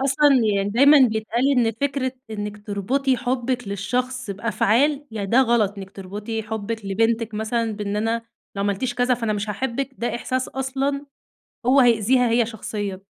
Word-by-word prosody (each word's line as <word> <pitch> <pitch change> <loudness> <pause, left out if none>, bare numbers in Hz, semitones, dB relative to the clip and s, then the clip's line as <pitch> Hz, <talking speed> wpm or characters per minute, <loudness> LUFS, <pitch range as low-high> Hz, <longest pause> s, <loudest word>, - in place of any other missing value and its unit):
أصلًا 275 +1 +4 0.2
يعني 195 0 0
دايمًا 280 +6 +6
بيتقال 220 +5 0
إن 235 -3 +2
فكرة 270 -2 -1 0.2
إنّك 210 0 -6
تربطي 255 +7 0
حُبِّك 245 -2 -2
للشخص 250 +4 -2
بأفعال 230 +8 +1
ي 210 -3 -4
ده 240 +6 +4
غلط، 225 -5 +2
إنّك 190 0 -8
تربطي 210 +4 -5
حُبِّك 220 0 -4
لبنتِك 225 +2 0
مثلًا 220 +1 -1
بإن 205 0 -3
أنا 225 +2 0 0.3
لو 200 - -1
عملتيش 205 +5 -1
كذا 245 +1 +2
فأنا 230 -3 -2
مش 210 0 -2
هاحبك، 265 +4 -2
ده 240 - -2
إحساس 255 +2 -2
أصلًا 270 +2 -2 0.6
هو 270 +2 +6
هيأذيها 245 +1 +4
هي 235 0 +3
شخصيًا. 205 -3 -5
230 Hz, 155 wpm, -23 LUFS, 210-260 Hz, 0.6 s, دايمًا